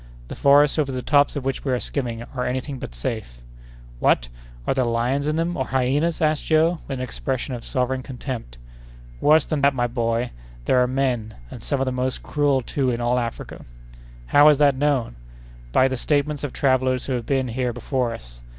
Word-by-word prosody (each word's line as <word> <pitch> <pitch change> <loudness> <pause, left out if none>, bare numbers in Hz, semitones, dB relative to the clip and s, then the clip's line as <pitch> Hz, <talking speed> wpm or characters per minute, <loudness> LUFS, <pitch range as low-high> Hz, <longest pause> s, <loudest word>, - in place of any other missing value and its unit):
The - - -6
forests 145 +2 +4
over 140 -3 +1
the 130 -1 -4
tops 145 0 +3
of 140 -2 -4
which 135 -1 -2
we 135 - -1
are 125 - +1
skimming 120 -5 -3
are 125 - -2
any 125 +1 -1
thing 135 0 -7
but - - -8
safe." 60 - -4 0.6
"What! - - +2 0.4
are - - +1
there 130 -1 +1
lions 120 +4 0
in 155 - 0
them, 165 +2 -1
or 130 - -2
hyenas?" 145 +6 +1
asked 155 -1 +1
Joe, 160 +2 +3
with 135 - -4
an 130 - -3
expression 130 +1 -3
of 120 -2 -6
sovereign 130 +1 -1
contempt. 125 - -7 0.6
"Worse 155 0 +5
than 150 -2 -2
that, 140 0 +3
my 120 -1 +1
boy! 115 0 -1 0.3
There 125 - +4
are 125 - +3
men, 125 -4 -1 0.2
and - - -9
some 140 - -1
of 135 - +1
the 130 - -1
most 130 0 -2
cruel, 145 -3 +1
too, 130 +1 -1
in 120 -1 -1
all 120 +1 +1
Africa." 115 -1 -5 0.6
"How 145 - +6
is 150 - +5
that 145 -1 +5
known?" 130 - 0 0.5
"By 130 - +4
the 130 -1 -2
statements 145 +2 0
of 145 - -3
travellers 130 -1 +1
who 135 - -2
have 120 -2 -3
been 135 -2 0
here 125 +1 -1
before 125 +1 -2
us. - - -10
130 Hz, 205 wpm, -23 LUFS, 120-145 Hz, 0.6 s, How